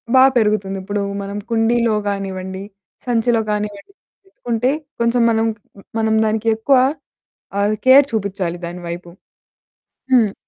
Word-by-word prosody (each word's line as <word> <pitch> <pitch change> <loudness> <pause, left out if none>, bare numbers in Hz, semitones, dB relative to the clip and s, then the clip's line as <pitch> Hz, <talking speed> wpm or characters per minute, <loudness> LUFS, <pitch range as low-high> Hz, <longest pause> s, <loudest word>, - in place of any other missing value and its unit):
బా 260 - +8
పెరుగుతుంది. 210 -3 +1
ఇప్పుడు 205 +1 -2 0.2
మనం 200 +1 -5
కుండీలో 230 0 +2
కానివ్వండి, 190 -1 -4 0.4
సంచిలో 235 -1 +2
కానివ్వండి 210 - -4 0.3
పెట్టుకుంటే 245 -8 -1 0.3
కొంచెం 235 +1 +2
మనం 225 0 +1
క్ - - -35 0.2
హ్మ్, 195 - -15
మనం 220 0 +2
దానిక్కేక్కువ 220 +4 +2 0.8
అది 210 +1 +1
కేర్ 270 +2 +8
చూపిచాలి 195 -5 -2
దాని 175 +1 -7
వైపు. 170 0 -7 1.0
హ్మ్ 220 -5 +4
215 Hz, 120 wpm, -19 LUFS, 195-230 Hz, 1.0 s, బా